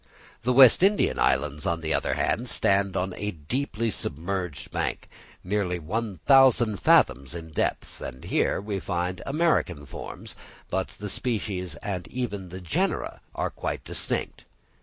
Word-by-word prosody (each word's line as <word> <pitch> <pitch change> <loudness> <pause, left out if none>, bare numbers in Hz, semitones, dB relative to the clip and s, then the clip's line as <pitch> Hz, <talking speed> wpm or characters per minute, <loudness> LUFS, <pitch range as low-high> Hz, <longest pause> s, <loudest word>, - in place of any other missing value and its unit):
The 125 - +1
West 130 +1 +8
Indian 200 +2 +3
Islands, 70 +2 +1
on 85 -1 0
the 80 0 -1
other - - 0
hand, 120 +2 0
stand 100 -2 +2
on 90 0 -1
a 105 +2 -3
deeply 115 - -2
submerged 90 -1 -4
bank, - - -2 0.4
nearly 90 -2 -1
one 100 +5 -3
thousand 130 -6 +6
fathoms 70 -1 +3
in 80 -1 -8
depth, - - -2
and 65 0 -7
here - - +1
we 100 0 -3
find 90 0 -2
American 140 - +1
forms, - - -8 0.4
but 95 -1 0
the 105 - -5
species 100 -6 -3
and 95 -3 -3
even 105 -7 -4
the 95 +2 -8
genera 85 -3 -1
are - - -1
quite - - -4
distinct. - - 0
95 Hz, 145 wpm, -26 LUFS, 85-115 Hz, 0.4 s, West